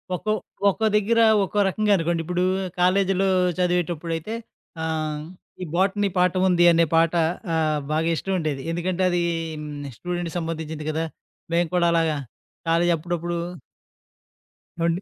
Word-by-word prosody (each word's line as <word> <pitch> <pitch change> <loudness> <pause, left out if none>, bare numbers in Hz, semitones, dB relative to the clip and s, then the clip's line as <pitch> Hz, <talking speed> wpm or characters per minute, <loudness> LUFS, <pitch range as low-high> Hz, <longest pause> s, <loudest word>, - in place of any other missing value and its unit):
ఒక్కో 215 +4 -1 0.4
ఒక్కో 220 +3 -1
దగ్గర 215 +2 +3 0.2
ఒక్కో 200 +2 -1
రకంగా 210 +2 +1
అనుకోండి. 170 0 0
ఇప్పుడు 180 +2 0 0.4
కాలేజీలో 190 +1 +3 0.3
చదివేటప్పుడైతే, 175 +1 -1 0.5
ఆహ్, 155 -2 -2 0.4
ఈ - - -2
'బోటనీ 195 +3 +2
పాట 180 -1 +3
ఉంది' 175 -1 +5
అనే 170 0 +4
పాట 165 0 +4 0.4
ఆహ్, 155 -2 +1
బాగా 160 +2 +1
ఇష్టం 195 +4 -3
ఉండేది. 150 -4 -2
ఎందుకంటే, 175 +2 -2
అదీను 160 -5 -3
స్టూడెంట్‌కి 175 -1 -4
సంబంధించింది 160 -2 -5
గదా! 160 +1 -1 0.5
మేము 170 -1 +2
కూడా 175 -1 +3
అలాగా 165 -2 +2 0.5
కాలేజీ 170 +1 +3
అప్పుడప్పుడు 175 +1 -3 1.4
ఏవండి? 170 +2 +1
170 Hz, 125 wpm, -24 LUFS, 160-180 Hz, 1.4 s, ఉంది